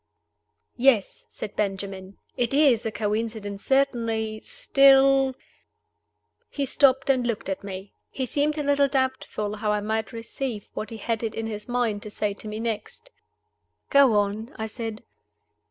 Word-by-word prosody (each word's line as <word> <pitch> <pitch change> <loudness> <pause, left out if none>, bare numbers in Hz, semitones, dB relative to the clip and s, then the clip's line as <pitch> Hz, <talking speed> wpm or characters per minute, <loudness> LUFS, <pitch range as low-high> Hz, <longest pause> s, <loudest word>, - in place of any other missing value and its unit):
"YES," 240 -5 +2
said 210 - -7
Benjamin. 195 -1 -3 0.2
"It 245 +2 0
is 265 -7 +4
a - - -2
coincidence 210 -1 -3
certainly. 230 -5 +1
Still 275 - +4 0.5
" - - -50
He 280 - +1
stopped 265 0 +3
and 250 -2 +1
looked 225 -4 -3
at 190 - -3
me. 195 0 -7 0.2
He 260 - -3
seemed 295 +4 0
a 300 - -1
little 285 0 +3
doubtful 260 -6 -1
how 210 0 0
I 210 - +1
might 220 +1 -2
receive 230 -1 -5
what 215 - -5
he 225 - -7
had 225 +1 -2
it 225 -2 -3
in 225 - -3
his 210 -1 -5
mind 240 -4 0
to 210 - -8
say 210 0 -2
to 210 - -11
me 215 +1 -5
next. 225 - -5 0.8
"Go 280 -4 +6
on," 205 +4 0
I 220 - -4
said. 220 0 -6
225 Hz, 155 wpm, -25 LUFS, 210-265 Hz, 0.8 s, Go